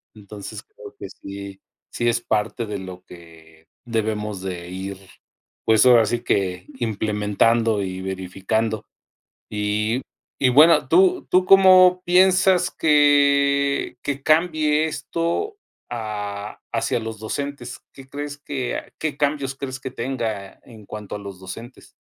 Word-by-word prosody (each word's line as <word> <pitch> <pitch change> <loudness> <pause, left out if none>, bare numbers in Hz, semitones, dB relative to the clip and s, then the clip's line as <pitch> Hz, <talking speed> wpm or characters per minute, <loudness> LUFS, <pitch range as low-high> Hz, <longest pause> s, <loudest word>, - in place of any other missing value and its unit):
Entonces, 105 -1 -9
creo 425 -1 -14
que - - -6
sí, 100 0 -9 0.3
sí 120 0 0
es 115 - +1
parte 110 +2 -1
de 105 -2 -5
lo 95 -1 -9
que 80 -2 -16 0.2
debemos 105 -3 -2
de 90 -2 -6
ir, 95 +1 -6 0.7
pues, 110 +2 +4
ahora 120 -3 +7
sí 115 +2 -2
que, 90 -2 -1
implementando 110 0 +1
y 95 -1 -5
verificando, 95 +4 -2 0.6
y 105 +3 -1 0.4
y 130 - +6
bueno, 155 +6 +6
¿tú 370 0 +3
tú 185 0 +3
cómo 185 -1 +7
piensas 185 0 +4
que 140 -3 +3
que 140 -1 -3
cambie 155 -1 +2
esto, 170 - -3 0.3
ah, 105 -3 -5
hacia - - 0
los 110 -1 -6
docentes? 140 +6 -5
¿Qué 135 -1 -13
crees 145 +1 -6
qué 140 -3 -4
a - - -9
qué 155 -2 -3
cambios 140 -2 -1
crees 130 -1 -6
que 130 -1 -6
tenga 115 -6 -4
en 110 -4 -14
cuanto 105 -1 -7
a - - -5
los 100 -2 -9
docentes? 115 +7 -10
115 Hz, 135 wpm, -22 LUFS, 100-145 Hz, 0.7 s, ahora